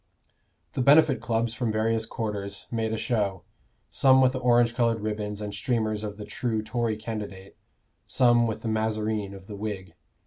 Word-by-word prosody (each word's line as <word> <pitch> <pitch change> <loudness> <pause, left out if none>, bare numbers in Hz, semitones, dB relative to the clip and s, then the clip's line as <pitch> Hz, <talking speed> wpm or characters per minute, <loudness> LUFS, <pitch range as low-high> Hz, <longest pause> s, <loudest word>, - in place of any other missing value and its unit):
The - - -1
Benefit 140 -2 +5
Clubs 115 -1 0
from 115 -1 -1
various 110 +1 0
quarters 100 -3 -4
made 115 -1 -1
a 110 - -1
show, 105 -6 -1 0.5
some 130 -1 +5
with 130 -1 +5
the 130 - -2
orange 120 -1 +3
colored 115 -2 +1
ribbons 105 -1 -3
and 105 -1 -4
streamers 110 -1 -1
of 105 -1 -5
the 105 - -7
true 110 0 -2
Tory 115 0 -1
candidate, 105 -3 -7 0.5
some 120 -2 +4
with 110 - -4
the - - -3
mazarine 110 -2 -1
of 95 -1 -12
the 105 - -8
Whig. 100 -4 -5
110 Hz, 170 wpm, -26 LUFS, 105-120 Hz, 0.5 s, Benefit